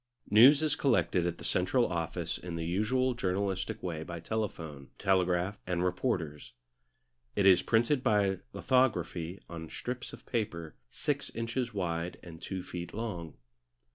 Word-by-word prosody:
News 135 +8 +8
is 150 -2 +3
collected 115 -11 +2
at 85 - -3
the - - -11
central 120 +7 +2
office 85 -2 -2
in 90 -2 -6
the 85 -1 -3
usual 120 +9 +1
journalistic 100 0 -2
way 85 -4 -3
by 85 +1 -6
telephone, 80 -8 -4
telegraph, 90 +1 +1
and 90 -1 0
reporters. 90 - -1 0.8
It 100 - +2
is 95 -2 +7
printed 120 +4 +2
by 105 -6 +2
lithography 100 -9 +1
on 80 -2 -7
strips 125 0 -5
of - - -12
paper 85 -9 -3 0.2
six - - -2
inches 120 +1 -2
wide 85 -2 -2
and 80 -2 -10
two 95 -2 -4
feet 90 0 -6
long. 90 -8 -4
95 Hz, 140 wpm, -31 LUFS, 85-115 Hz, 0.8 s, News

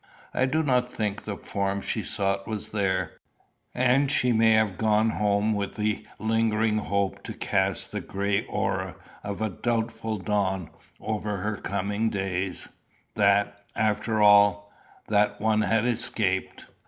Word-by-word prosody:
I 130 - +2
do 155 +4 +1
not 125 -3 +1
think 105 -3 -3
the 100 -2 -4
form 100 -1 -2
she 110 - -1
sought 100 -2 -1
was 110 -2 -3
there; 95 -4 -1 0.6
and 130 +2 +3
she 125 -4 +2
may 115 0 +5
have 110 -4 +2
gone 110 0 +3
home 105 +1 +1
with 100 -1 -3
the 105 -1 -2
lingering 110 -1 +1
hope 100 -2 -1
to - - -7
cast - - 0
the - - -3
gray 100 0 -1
aurora - - -2 0.3
of 100 +1 -4
a 110 - 0
doubtful 115 +1 -2
dawn 95 -3 -1 0.3
over 105 -1 -3
her 105 +2 -2
coming 100 +4 -1
days, 95 -2 -2 0.5
that, 100 0 +2
after 110 0 +1
all, 100 0 +5 0.4
that 105 0 +2
one 110 0 +2
had 115 +1 +2
escaped. 110 -5 -1
105 Hz, 140 wpm, -26 LUFS, 100-110 Hz, 0.6 s, may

